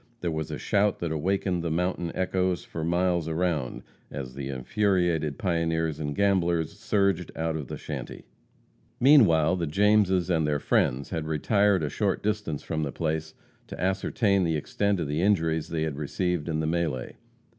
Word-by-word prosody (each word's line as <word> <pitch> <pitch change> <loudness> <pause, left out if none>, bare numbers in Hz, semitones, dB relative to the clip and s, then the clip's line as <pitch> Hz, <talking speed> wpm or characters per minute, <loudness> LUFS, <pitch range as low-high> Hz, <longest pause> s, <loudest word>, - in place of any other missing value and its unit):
There 85 - -1
was 80 -1 -3
a - - -4
shout 100 0 +1
that 85 -2 -3
awakened 90 +2 0
the 85 - -1
mountain 90 +1 -1
echoes 95 -1 0
for 80 - -5
miles 85 0 +1
around, 80 -6 -1 0.3
as 65 -2 -6
the 70 0 -5
infuriated 85 +1 0
pioneers 80 -3 0
and 75 -2 -3
gamblers 85 -4 +1
surged 100 -5 +1
out 80 0 -1
of 75 -4 -4
the - - -6
shanty. - - -7 0.7
Meanwhile 95 - +5
the 85 -2 -2
Jameses 95 0 +3
and 80 -3 +2
their 75 -1 +1
friends 65 -1 0
had 80 -3 -3
retired 100 +4 +2
a 75 - -1
short - - -1
distance 105 -8 -2
from 80 -1 -2
the 75 -2 -2
place 80 0 -3 0.3
to - - -9
ascertain 95 +2 +1
the 80 -2 +1
extent 100 +6 -1
of 80 - -2
the 75 +3 -1
injuries 80 -5 +1
they 80 -1 -1
had 80 -3 -3
received 85 +2 -2
in 80 -1 0
the 80 - -1
melee. 80 -6 -2
85 Hz, 170 wpm, -27 LUFS, 80-95 Hz, 0.7 s, Meanwhile